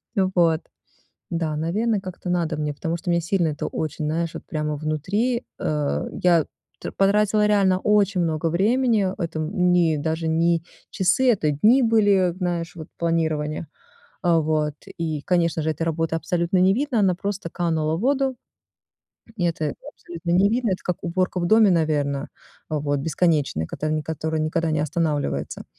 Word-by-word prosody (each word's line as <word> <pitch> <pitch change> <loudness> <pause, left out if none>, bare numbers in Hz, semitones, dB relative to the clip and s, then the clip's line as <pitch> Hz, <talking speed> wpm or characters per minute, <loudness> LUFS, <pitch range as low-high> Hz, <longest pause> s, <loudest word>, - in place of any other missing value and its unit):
ну 190 -2 +2
вот. 165 -2 +3 0.7
Да, 165 -2 -1
наверное, 205 +8 0
как-то 185 -1 -7
надо 170 -3 0
мне, 150 -1 -2
потому 165 +3 -3
что 175 +1 -6
меня 170 0 +3
сильно 170 0 +1
это 150 -2 -3
очень, 155 -1 -3
знаешь, 165 +2 -1
вот - - -7
прямо 150 -1 -2
внутри, 195 - -1 0.2
э. 150 -2 -1
Я 170 -4 +4 0.3
т - - -6
потратила 210 +1 +2
реально 195 -3 +3
очень 200 -3 +2
много 160 0 0
времени, 215 +3 +2
это 165 -2 -3
не 175 -1 +2
даже 160 +2 -2
не 165 +1 +2 0.3
часы, 195 +8 +3
это 160 -8 +1
дни 220 - +4
были, 205 -6 +3
знаешь, 175 -2 -3
вот, 160 -2 -8
планирование, 160 -2 -1 0.6
а, 170 -2 +4
вот. 155 -1 0 0.2
И, 160 -3 -2
конечно 170 -2 +1
же, 160 - -1
эта 160 +2 -2
работа 165 0 -1
абсолютно 170 +2 0
не 185 +2 +5
видна, 260 -1 0
она 190 -3 +3
просто 200 -2 -4
канула 160 -3 0
в - - -5
воду. 265 +1 +1 1.0
И 180 - -3
это 160 -3 -1 0.2
абсолютно 170 0 -7
не 190 +3 +4
видно. 235 0 0
Это 185 - -3
как 180 - -1
уборка 180 +1 -1
в 175 - 0
доме, 215 0 +5
наверно, 150 -4 0 0.4
вот, 145 -2 -1
бесконечная, 150 - 0
которая, 155 - -2
ни - - -4
которая 160 0 -3
никогда 160 +1 0
не 155 - 0
останавливается. 155 -1 -2
170 Hz, 165 wpm, -23 LUFS, 155-190 Hz, 1.0 s, не